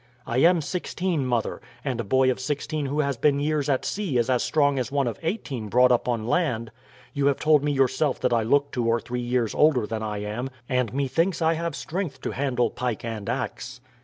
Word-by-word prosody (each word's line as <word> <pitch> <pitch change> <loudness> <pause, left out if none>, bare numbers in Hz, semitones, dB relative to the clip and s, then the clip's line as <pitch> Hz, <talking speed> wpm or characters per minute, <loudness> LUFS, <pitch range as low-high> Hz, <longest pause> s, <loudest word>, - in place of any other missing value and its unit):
"I 120 - 0
am 170 +3 +5
sixteen, 175 -3 -2
mother; 120 -3 -1 0.2
and 125 -4 -1
a - - -5
boy 130 +5 +3
of 130 - -4
sixteen 145 +2 -2
who 145 +3 0
has 140 -3 -1
been 140 +3 +2
years 150 0 0
at 135 -2 +1
sea 190 -11 -1
is 120 +2 +1
as 125 - +2
strong 145 -3 +2
as 125 +1 -3
one 140 -1 +1
of 120 - -3
eighteen 150 - -3
brought 125 +4 +5
up 125 - +2
on 115 -3 -1
land. 120 -6 0 0.4
You 140 -2 +1
have 140 - +2
told 150 -2 +3
me 145 - +1
yourself 135 +1 +1
that 125 -1 +2
I 115 - +3
look 140 +5 +2
two 120 -2 -1
or 115 0 +2
three 125 +1 -4
years 120 -2 0
older 145 -7 +3
than 110 0 -4
I 105 -1 -3
am, 115 +5 -4 0.2
and 125 -4 0
methinks 155 - 0
I 165 -1 +3
have 170 +1 -3
strength 165 -6 -4
to - - -3
handle 125 -4 0
pike 125 -2 -3
and 110 -3 -4
axe." - - -4
130 Hz, 220 wpm, -25 LUFS, 120-150 Hz, 0.4 s, am